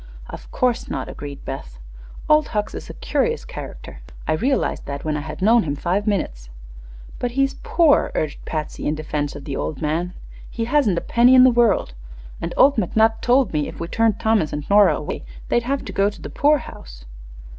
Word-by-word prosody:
"Of - - -10
course 250 -1 0
not," 130 -2 -3
agreed 145 -1 -8
Beth. 65 - -7 0.5
"Old 305 0 +4
Hucks 210 -1 -2
is - - -8
a - - -8
curious 465 0 -1
character. - - -9 0.3
I 155 - +2
realized 260 - -1
that 140 +1 -5
when 155 -1 -1
I - - -1
had 155 +5 -6
known 230 +3 +5
him 145 -6 -2
five 185 +8 -1
minutes." - - -2 0.7
"But 245 -1 -2
he's 275 0 +2
poor," 340 -11 +3
urged 155 -2 -3
Patsy, 155 -2 -4
in 150 - 0
defense 150 -2 -3
of 145 - -8
the 140 - -4
old 150 - -3
man. 165 +4 -2 0.4
"He 230 - -3
hasn't 240 -8 +2
a - - 0
penny 245 +2 +4
in 255 - +8
the 255 - +7
world, 230 - +2 0.5
and - - -3
McNutt 225 -3 +3
told 250 -4 +3
me 150 -1 0
if - - -9
we 170 - -4
turned 225 +2 +1
Thomas 220 -8 +1
and 145 0 -5
Nora 205 0 +6
away - - -5 0.3
they'd 240 - +2
have 275 0 -1
to - - -7
go 200 +1 +2
to 205 - -12
the - - -8
poorhouse." 235 - -1
205 Hz, 195 wpm, -21 LUFS, 150-245 Hz, 0.7 s, in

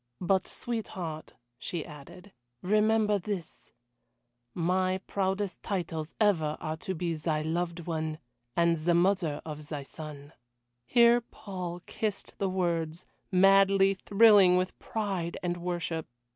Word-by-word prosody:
"But, 185 +1 +1
sweetheart," 185 -9 -5 0.2
she 165 +3 -4
added, 170 +7 -12 0.3
"remember 210 +1 +3
this 190 -4 -6 0.8
my 185 +2 +1
proudest 195 -1 -2
titles 165 -5 -3
ever 165 -8 +2
are 155 0 -4
to 190 +4 -4
be 170 0 -1
thy 155 -1 -1
Loved 170 +2 -2
one, 160 -2 -2 0.4
and 170 -1 +3
the 170 +2 +1
Mother 175 -4 +1
of 150 -1 -7
thy 145 -3 -4
son." 150 0 -10 0.5
Here 240 0 +5
Paul 180 -6 -7
kissed 215 -3 -4
the 195 - +1
words, 170 -3 -1 0.3
madly 195 +1 +5
thrilling 200 -2 +6
with 185 0 -2
pride 195 -6 -3
and 175 0 -1
worship. 170 -2 -3
180 Hz, 120 wpm, -29 LUFS, 160-195 Hz, 0.8 s, thrilling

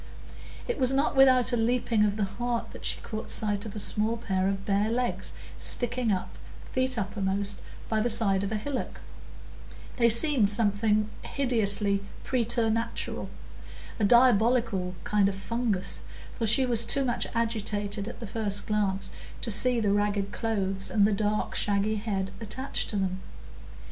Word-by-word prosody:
It 485 - -3
was 255 -1 +4
not 275 +2 0
without 255 -2 +5
a - - +4
leaping 230 -1 +1
of 205 -1 -1
the 210 - 0
heart 235 +4 -3
that - - -9
she - - -1
caught 220 +1 -7
sight 205 -1 0
of 210 - -10
a - - -5
small 215 +2 -1
pair 190 -4 -1
of 195 0 -3
bare 205 +1 +1
legs 245 +1 -2 0.3
sticking 245 -1 0
up, 185 -2 -4 0.3
feet 255 -1 -1
uppermost, 200 -1 -1 0.3
by 220 - 0
the 240 - 0
side 205 -4 +2
of 200 - -3
a - - -1
hillock; 260 +5 -5 1.0
they 235 -2 +4
seemed 235 -2 +6
something 210 0 +4
hideously 205 -6 +3 0.2
preternatural,—a 230 -2 -3
diabolical 230 -4 +3
kind 205 -2 +2
of 195 - -5
fungus; 200 -1 -3 0.3
for 230 - -2
she 260 +5 +3
was 235 -2 -1
too 275 +4 -1
much 240 -2 -1
agitated 210 -3 -2
at - - -8
the 235 - -6
first 205 -1 0
glance 205 -3 -1 0.3
to 230 - 0
see 245 +3 +4
the 205 -3 +1
ragged 205 -1 -1
clothes 195 -4 0
and 205 -2 +3
the 215 - +2
dark 210 +1 -1
shaggy 205 +1 0
head 200 -3 -3
attached 260 +5 -3
to - - -4
them. 190 -1 -2
215 Hz, 155 wpm, -27 LUFS, 200-235 Hz, 1.0 s, seemed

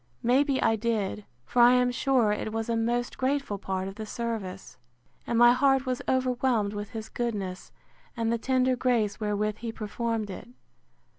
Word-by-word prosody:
May 255 +4 +4
be 275 -2 0
I 225 - +3
did; 210 -2 -2 0.2
for 245 - +2
I 240 +1 +8
am 250 0 +3
sure 245 -3 +2
it 210 +1 -2
was 225 +1 -3
a 230 - +1
most 240 +2 -1
grateful 265 -5 -1
part 190 -1 -3
of 195 - -6
the 215 +2 -7
service, 210 - -5 0.5
and 235 - 0
my 240 +1 +8
heart 270 +1 +3
was 255 -1 -2
overwhelmed 250 -5 +1
with 205 0 -5
his 220 -2 -6
goodness, 200 -6 -4 0.5
and 230 0 0
the 235 - -1
tender 255 +1 +2
grace 230 -5 0
wherewith 210 0 -1
he 230 0 -5
performed 225 0 -3
it. 190 - -9
230 Hz, 175 wpm, -27 LUFS, 210-250 Hz, 0.5 s, I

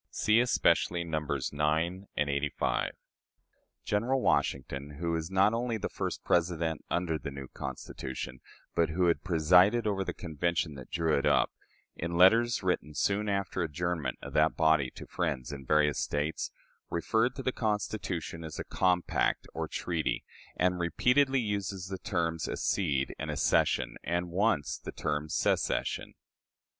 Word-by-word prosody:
(See 110 +2 +3
especially 85 -7 +2
Nos. 80 -3 -2
IX. 75 - -9 0.6
and 75 - +2
LXXXV.) 70 +1 0 1.0
General 120 +6 +1
Washington 70 - 0
who 85 -1 -1
was 80 0 -2
not 95 +3 +4
only 115 0 -1
the - - -3
first - - -4
President 85 -2 +1
under 85 -3 0
the 70 - -5
new 70 -1 -7
Constitution, 65 0 -6 0.3
but 85 -1 +2
who 90 +3 +1
had 85 - +2
presided 90 +6 +4
over 100 -2 0
the - - -3
Convention 80 -1 -1
that 65 -3 -10
drew 80 -2 +1
it 70 - +1
up - - +3 0.4
in 85 +1 -3
letters 115 +6 +5
written 90 -5 -1
soon 105 +4 +1
after 100 -1 -1
the 85 - +2
adjournment 80 -3 -2
of - - -7
that - - +3
body 80 -4 +4
to - - -8
friends 65 -1 -2
in 70 -2 -8
various 75 -2 +3
States, 75 +2 -1 0.4
referred 110 +9 +1
to 135 - -5
the 130 - +1
Constitution 105 -7 -2
as 80 -1 -7
a - - -3
compact 90 -1 +1
or - - -3
treaty, 80 -3 -2 0.3
and 90 0 +2
repeatedly 130 - +3
uses 100 -3 -3
the 95 -1 -4
terms 85 -3 -1
"accede" 70 -9 0
and - - -4
"accession," - - +1
and 85 +1 -1
once 95 - +1
the - - -7
term 75 0 -2
"secession." - - 0
85 Hz, 150 wpm, -30 LUFS, 75-100 Hz, 1.0 s, letters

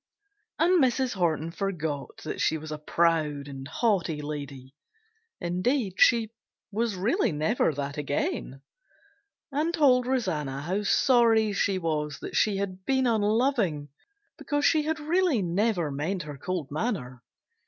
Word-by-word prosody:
And 345 -2 +4
Mrs. 255 0 +1
Horton 165 -3 0
forgot 160 -7 -4
that 155 - -4
she 160 - +2
was 155 0 -8
a 155 - -5
proud 155 -3 +1
and 135 -1 -8
haughty 175 -4 0
lady 140 -3 -7 0.7
(indeed 190 +4 -1
she 230 -3 +5 0.4
was 220 0 -1
really 230 - +1
never 160 +5 +1
that 145 0 -4
again) 140 -1 -3 0.9
and 300 +4 0
told 260 -7 +4
Rosanna 155 - -1
how 185 +6 -1
sorry 225 -1 +3
she 195 -1 +1
was 150 -4 -2
that - - -6
she 210 -2 +2
had 190 -1 -4
been 265 +3 +1
unloving 215 - +1 0.5
because 290 -1 -1
she 310 - +4
had 315 +1 -2
really 315 - +1
never 180 -2 0
meant 160 +6 -2
her 150 -1 -7
cold 170 0 -4
manner. 145 - -3
185 Hz, 135 wpm, -27 LUFS, 150-240 Hz, 0.9 s, she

